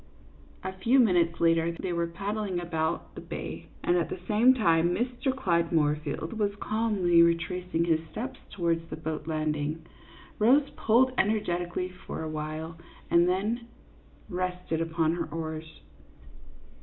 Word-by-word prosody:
A 190 - -3
few 240 +7 +4
minutes 175 -8 +3
later 165 0 +3
they 175 +1 -4
were 170 0 0
paddling 200 +2 -3
about 165 -1 -2
the - - -8
bay; - - -6 0.2
and 175 - +3
at 170 - 0
the - - -5
same 235 +5 +5
time 170 -5 +3
Mr. 250 +3 -1
Clyde 170 -11 0
Moorfield 155 +4 0
was 205 -1 +1
calmly 205 -6 +2
retracing 170 0 +1
his 165 -2 +3
steps 255 +3 -5
towards 170 -2 0
the - - -4
boat 160 -1 -5
landing. 155 0 -2 0.5
Rose 270 +7 +5
pulled 250 +4 +3
energetically 180 -4 0
for 180 -3 -7
a 160 - -4
while 155 +2 -5 0.3
and 170 +1 +5
then 215 +6 -1 0.6
rested 180 -3 -2
upon 165 -1 +1
her 170 - -2
oars. 160 0 -6
175 Hz, 140 wpm, -28 LUFS, 165-210 Hz, 0.6 s, same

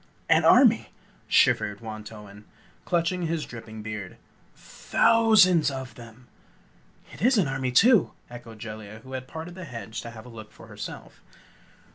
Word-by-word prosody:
"An - - +4
army!" - - +5 0.4
shivered 100 0 +2
Wantowin, 105 -2 -10 0.4
clutching 175 0 0
his 165 -1 -2
dripping 110 -2 -10
beard 105 -4 -7 0.7
"Thou 230 -1 +4
sands 180 -7 +5
of 130 -3 -7
them!" 120 +1 -14 0.9
"It - - -12
is 245 +3 +3
an 185 -8 +2
army, 135 -1 -2
too!" 225 - +4
echoed 120 -2 -11
Jellia, 110 0 -9
who 130 - -11
had 130 0 -6
parted 160 +4 -8
the 185 +1 -9
hedge 115 -5 -7
to 115 - -8
have 110 -1 -12
a - - -11
look 110 -2 -11
for - - -15
herself. - - -10
120 Hz, 150 wpm, -25 LUFS, 110-165 Hz, 0.9 s, army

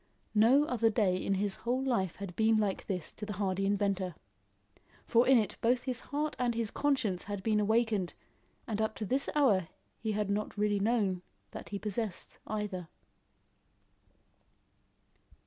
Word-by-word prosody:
No 235 +7 +6
other 230 -5 +2
day 205 -5 +2
in 195 +1 0
his 200 0 0
whole 250 +3 -1
life 210 -10 0
had 195 -3 -7
been 220 0 +4
like 205 -3 -1
this 180 -5 -3
to - - -10
the 210 0 -3
hardy 195 -1 0
inventor; 195 -3 0 0.9
for 235 +1 +4
in 265 -1 +7
it 215 -3 0
both 245 +1 +2
his 255 -3 -2
heart 295 +2 -3
and 245 -2 +1
his 230 -2 0
conscience 265 -11 0
had 205 -2 -5
been 215 0 +2
awakened, 215 -3 +1 0.5
and 220 -2 -2
up 220 0 0
to 215 - -4
this 265 +6 0
hour 210 - +4 0.3
he 220 -1 -2
had 210 0 0
not 210 +1 -2
really 205 -1 +2
known 200 -4 +1 0.3
that - - -8
he 205 - -3
possessed 210 -1 -4
either. 210 -5 -3
210 Hz, 160 wpm, -32 LUFS, 195-235 Hz, 0.9 s, in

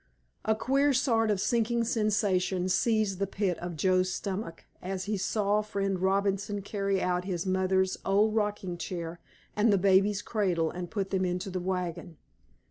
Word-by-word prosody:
A 220 +1 +3
queer 275 +5 +2
sort 230 -4 +2
of 210 - +3
a 190 - -4
sinking 235 +1 +1
sensation 205 -5 +1
seized 215 -1 +1
the 200 - 0
pit 190 -2 -1
of 175 -1 -5
Joe's 185 +3 +2
stomach 190 -3 -5 0.2
as 190 0 -4
he 210 +2 -2
saw 205 +1 +1
Friend 195 -3 -2
Robinson 195 +1 0
carry 195 -1 -1
out 180 0 0
his 180 -2 -3
mother's 190 0 +1
old 205 +3 +3
rocking 205 -5 -1
chair 170 -2 -5 0.4
and 210 +1 +3
the 200 - +4
baby's 195 +2 +3
cradle 180 -7 0
and 175 -1 -6
put 195 -3 -3
them 190 -1 +1
into 180 +1 -2
the 185 - -2
wagon. 180 -3 -4
195 Hz, 165 wpm, -29 LUFS, 185-210 Hz, 0.4 s, the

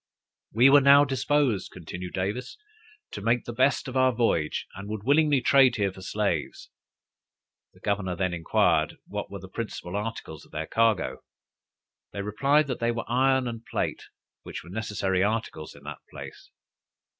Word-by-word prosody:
"We 125 +5 +5
were 145 0 +8
now 140 +1 +7
disposed," 135 -4 0
continued 90 +1 -8
Davis, 100 +7 -3 0.5
"to 105 - -6
make 115 +3 +1
the 120 - -5
best 135 +5 +2
of 130 - -6
our 130 0 +4
voyage, 115 -10 0
and 100 +2 -8
would 105 -1 -5
willingly 145 +1 +3
trade 135 +1 +5
here 100 -3 0
for 95 - -12
slaves." 95 -6 -2 1.0
The - - -21
governor 95 -3 -1
then 95 0 -1
inquired 85 -2 +1
what - - -5
were - - -7
the - - -10
principal 90 +2 -6
articles 105 -7 -5
of - - -20
their 75 +1 -4
cargo. 115 +2 +1 0.9
They 100 - -4
replied, 140 +9 +2
that 130 -3 -4
they 115 - +1
were 115 -1 -2
iron 130 +1 +2
and 115 -1 -6
plate, - - -3 0.4
which - - -8
were 85 - -12
necessary 95 -3 -1
articles 105 -7 -2
in 70 - -16
that 75 +1 -7
place. - - -10
110 Hz, 165 wpm, -26 LUFS, 95-130 Hz, 1.0 s, were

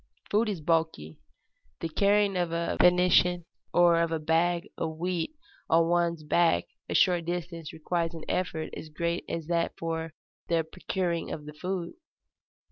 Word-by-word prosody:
Food 215 +2 +3
is 190 -6 -3
bulky. 160 - -1 0.6
The - - -2
carrying 200 +4 +2
of 175 -2 0
a 170 0 -1
venison 180 -1 +4 0.3
or 175 -1 +5
of 170 -1 0
a 165 - +1
bag 170 +4 +1
of 160 -1 -3
wheat 180 - -2 0.3
on 165 0 +4
one's 170 -2 +1
back 165 +2 +3 0.3
a - - -2
short 175 -3 +4
distance 170 -2 -4
requires 165 +1 -2
an 160 - -8
effort 165 -4 -2
as 155 - -8
great 170 +3 -2
as 165 -2 -3
that 170 +1 -1
for 165 -1 -4 0.3
the 165 -1 +2
procuring 175 0 -2
of 150 - -6
the 150 - -8
food. 180 +2 -4
170 Hz, 155 wpm, -28 LUFS, 160-180 Hz, 0.6 s, or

